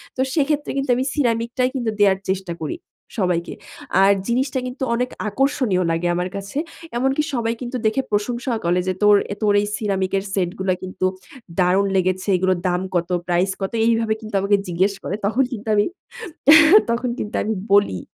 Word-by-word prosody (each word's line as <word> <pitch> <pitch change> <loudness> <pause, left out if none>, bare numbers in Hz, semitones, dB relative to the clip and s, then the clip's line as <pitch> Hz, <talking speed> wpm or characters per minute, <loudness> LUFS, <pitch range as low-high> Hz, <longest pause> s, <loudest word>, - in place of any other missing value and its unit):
তো 260 - -1
সেক্ষেত্রে 295 -1 0
কিন্তু 275 0 -2
আমি 255 - 0
সিরামিকটাই 240 -2 0
কিন্তু 240 -4 -1
দেওয়ার 195 -2 +4
চেষ্টা 190 -2 -2
করি 155 - -3 0.4
সবাইকে। 180 -4 0 0.5
আর 195 +1 +6 0.2
জিনিসটা 260 +2 0
কিন্তু 255 +1 -5
অনেক 250 +1 -1 0.2
আকর্ষণীয় 245 -5 +1
লাগে 165 +1 0
আমার 180 +1 -2
কাছে। 200 +6 -6 0.4
এমনকি 270 +4 +1
সবাই 230 -2 0
কিন্তু 250 +1 -4
দেখে 220 +5 +2
প্রশংসাও 235 +3 -1
করে 175 +1 +2
যে 185 - +1
তোর 210 0 +7 0.3
তোর 210 -1 +3
এই 205 - -2
সিরামিকের 195 -3 -1
সেটগুলা 190 0 -1
কিন্তু 185 0 -3 0.5
দারুন 185 +2 +3
লেগেছে। 185 +1 0
এগুলোর 185 -1 +1
দাম 180 0 0
কত? 175 0 0 0.2
প্রাইস 180 +2 +1
কত? 195 - -2
এইভাবে 225 -1 +2
কিন্তু 215 -2 -7
আমাকে 200 +1 +3
জিজ্ঞেস 185 +3 +1
করে। 200 - -3
তখন 225 +6 +2
কিন্তু 225 -1 -7
আমি, 205 - +3 1.1
তখন 245 +1 -1
কিন্তু 210 - -4
আমি 220 - -1 0.2
বলি। 200 - +3
205 Hz, 165 wpm, -21 LUFS, 185-240 Hz, 1.1 s, তোর